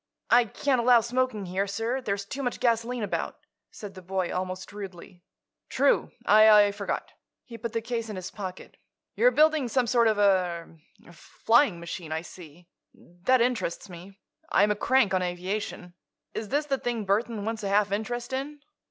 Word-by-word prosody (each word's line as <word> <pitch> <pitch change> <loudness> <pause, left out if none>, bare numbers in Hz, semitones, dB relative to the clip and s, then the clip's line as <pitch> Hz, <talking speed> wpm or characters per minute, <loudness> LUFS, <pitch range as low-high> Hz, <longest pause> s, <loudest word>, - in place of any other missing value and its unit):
"I 245 0 +6
can't 255 +3 0
allow 240 -1 +6
smoking 235 -3 -1
here, 190 +3 -2
sir; 225 +6 -2
there's 200 -4 -3
too 270 +7 -6
much 245 -2 -3
gasoline 235 0 0
about," 205 - -3 0.3
said 205 -2 -10
the 185 - -11
boy, 185 0 -2
almost 185 +1 -4
rudely. 190 -3 -9 0.5
"True. - - +2 0.2
I 210 -1 +7
forgot." 200 - -4 0.3
He 235 - -10
put 230 0 -6
the 230 -1 -2
case 230 -1 -3
in 210 - -5
his 185 0 -6
pocket. 190 -3 -8 0.4
"You're - - +4
building 310 - +3
some 250 +2 +1
sort 235 0 +3
of 215 -1 +2
a—er—er—flying 180 - 0
machine, 170 -1 -7
I 160 +1 -2
see. 175 -1 -13 0.3
That 190 +9 0
interests 235 -6 -1
me. 180 +3 -12 0.3
I'm 205 +2 +3
a - - +1
crank 235 -1 +2
on 185 - +2
aviation. 180 0 -4 0.4
Is 215 - -5
this 290 +2 0
the 275 -2 -1
thing 235 -3 -3
Burthon 210 +1 0
wants 225 0 -3
a 200 - -3
half 205 0 +2
interest 240 +4 -3
in?" 285 +3 -4
210 Hz, 170 wpm, -27 LUFS, 185-240 Hz, 0.5 s, I